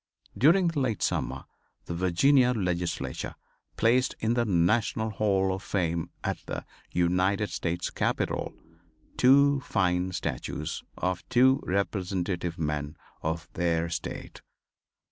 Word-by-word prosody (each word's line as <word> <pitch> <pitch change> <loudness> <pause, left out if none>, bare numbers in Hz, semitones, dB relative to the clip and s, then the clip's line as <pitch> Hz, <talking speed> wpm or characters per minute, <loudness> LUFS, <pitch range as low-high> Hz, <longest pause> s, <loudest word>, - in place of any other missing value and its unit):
During 170 +6 +5
the 165 -3 -2
late 120 -6 0
summer - - -1 0.4
the - - -4
Virginia 125 +10 +4
legislature 90 -5 -2 0.4
placed 125 +3 +3
in 115 +1 +1
the 120 -1 +1
National 110 +4 +1
Hall 95 -2 +1
of 95 - -5
Fame, 85 -4 -1
at - - -2
the - - -4 0.2
United 90 +4 +1
States 85 +1 -2
Capitol, - - -1 0.6
two 140 +2 +5
fine 90 -6 0
statues 90 -3 -4 0.2
of 90 -1 -1
two 130 +2 +5
representative 90 -3 -1
men 75 -1 -3 0.2
of 80 +1 -3
their 85 -1 0
state. 85 - -6
95 Hz, 115 wpm, -28 LUFS, 85-120 Hz, 0.6 s, During